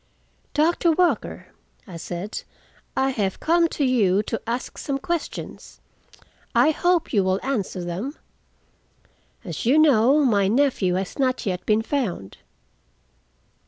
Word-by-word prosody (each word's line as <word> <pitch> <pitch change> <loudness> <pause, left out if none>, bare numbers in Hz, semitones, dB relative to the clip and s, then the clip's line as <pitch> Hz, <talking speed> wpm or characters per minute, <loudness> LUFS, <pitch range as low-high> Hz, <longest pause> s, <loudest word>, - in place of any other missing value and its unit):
"Doctor 335 +2 +3
Walker," 355 +2 0 0.4
I 185 -6 -10
said, 175 +5 -5 0.6
"I 265 0 +2
have 200 -6 -2
come 335 +1 +3
to 305 - -3
you 210 -6 +2
to 225 - -4
ask 240 +3 -4
some 275 -1 -2
questions. 345 0 -5 0.8
I 310 - +5
hope 350 0 +1
you 200 -4 +3
will 185 +1 +1
answer 205 -9 -2
them. 190 - -5 1.3
As 170 +4 -4
you 270 +5 +5
know, 285 -1 +5
my 200 -6 +3
nephew 220 -6 +2
has 190 +8 -4
not 255 -2 0
yet 180 -3 -2
been 215 +1 +3
found." 215 - -3
245 Hz, 125 wpm, -23 LUFS, 195-295 Hz, 1.3 s, I